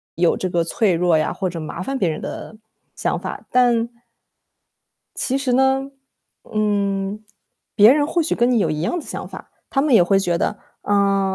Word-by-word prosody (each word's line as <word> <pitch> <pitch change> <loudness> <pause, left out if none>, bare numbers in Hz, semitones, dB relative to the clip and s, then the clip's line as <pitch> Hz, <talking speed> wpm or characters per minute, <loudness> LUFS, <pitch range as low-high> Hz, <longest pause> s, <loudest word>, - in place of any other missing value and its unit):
有 170 +1 +2
这 185 - -3
个 170 -1 +1
脆 200 +1 +1
弱 170 -1 +2
呀， 155 - 0
或 185 - -2
者 170 -1 -6
麻 155 - -6
烦 270 0 -3
别 180 -7 +1
人 155 - -4
的 215 - -7 0.4
想 - - -1
法。 - - -7
但 240 -2 +3 1.3
其 265 +1 -1
实 265 -3 -1
呢， 265 +1 +2 0.6
嗯， 205 -1 -1 0.5
别 215 +5 +7
人 290 0 +2
或 340 +2 0
许 315 - -1
跟 240 +1 +2
你 245 - +3
有 165 -6 +1
一 155 0 -2
样 345 - -1
子 - - -12
想 - - -5
法。 - - -11 0.2
他 270 - +1
们 295 -3 +1
也 180 - +7
会 195 +2 +3
觉 175 -2 0
得， 210 - -1 0.3
嗯， 195 -1 +1
205 Hz, 205 characters per minute, -21 LUFS, 180-255 Hz, 1.3 s, 别